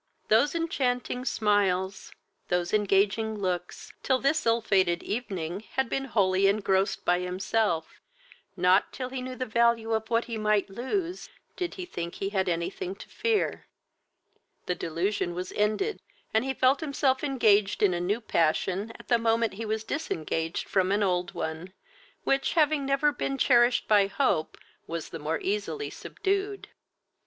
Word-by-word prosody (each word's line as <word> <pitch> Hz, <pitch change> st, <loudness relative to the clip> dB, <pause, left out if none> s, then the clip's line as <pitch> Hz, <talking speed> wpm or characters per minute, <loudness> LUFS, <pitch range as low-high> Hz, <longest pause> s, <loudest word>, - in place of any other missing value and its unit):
Those 240 Hz, +9 st, +4 dB
enchanting 255 Hz, -6 st, -1 dB
smiles, 195 Hz, -4 st, +1 dB, 0.4 s
those 180 Hz, +1 st, -1 dB
engaging 210 Hz, +1 st, +2 dB
looks, 180 Hz, -3 st, -4 dB
till 260 Hz, -, +2 dB
this 275 Hz, +1 st, +1 dB
ill 230 Hz, +1 st, +4 dB
fated 185 Hz, -6 st, +2 dB
evening, 195 Hz, -6 st, -3 dB
had 265 Hz, -3 st, 0 dB
been 270 Hz, -, -1 dB
wholly 195 Hz, -5 st, +2 dB
engrossed 195 Hz, -1 st, +1 dB
by 180 Hz, 0 st, +3 dB
himself, 180 Hz, -1 st, -1 dB, 0.6 s
not, 180 Hz, +2 st, +3 dB
till 255 Hz, -1 st, -5 dB
he 260 Hz, 0 st, -4 dB
knew 255 Hz, 0 st, -5 dB
the 255 Hz, -, -3 dB
value 235 Hz, -1 st, +2 dB
of 220 Hz, 0 st, -1 dB
what 230 Hz, 0 st, +1 dB
he 230 Hz, -2 st, -4 dB
might 210 Hz, -2 st, +1 dB
lose, 340 Hz, -, -3 dB, 0.3 s
did 360 Hz, -3 st, -3 dB
he 370 Hz, -, -5 dB
think 170 Hz, -, -5 dB
he 195 Hz, -, -3 dB
had 190 Hz, -2 st, 0 dB
anything 175 Hz, +2 st, -3 dB
to -, -, -12 dB
fear; 440 Hz, -1 st, -1 dB, 1.0 s
the 180 Hz, -, 0 dB
delusion 175 Hz, +2 st, -2 dB
was 180 Hz, +1 st, -4 dB
ended, 215 Hz, -, 0 dB, 0.3 s
and 220 Hz, +3 st, +2 dB
he 270 Hz, -, -1 dB
felt 260 Hz, +2 st, +3 dB
himself 280 Hz, -3 st, 0 dB
engaged 215 Hz, -9 st, +3 dB
in 195 Hz, -3 st, +4 dB
a 175 Hz, -, -2 dB
new 200 Hz, +6 st, 0 dB
passion 190 Hz, +3 st, 0 dB
at -, -, -14 dB
the 235 Hz, -, +3 dB
moment 230 Hz, -1 st, +1 dB
he 225 Hz, +4 st, -5 dB
was 220 Hz, 0 st, -1 dB
disengaged 165 Hz, -, -3 dB
from 190 Hz, -1 st, +1 dB
an 205 Hz, +1 st, +2 dB
old 180 Hz, -2 st, 0 dB
one, 160 Hz, +4 st, -5 dB, 0.5 s
which, 275 Hz, 0 st, +1 dB
having 305 Hz, -4 st, +2 dB
never 275 Hz, +2 st, +3 dB
been 275 Hz, -1 st, -3 dB
cherished 240 Hz, -2 st, +4 dB
by 205 Hz, -2 st, +5 dB
hope, 200 Hz, -, 0 dB, 0.3 s
was 165 Hz, -1 st, -5 dB
the 165 Hz, -, -7 dB
more 155 Hz, +2 st, -2 dB
easily 210 Hz, -, -2 dB
subdued. 400 Hz, 0 st, -3 dB
215 Hz, 155 wpm, -28 LUFS, 185-255 Hz, 1.0 s, by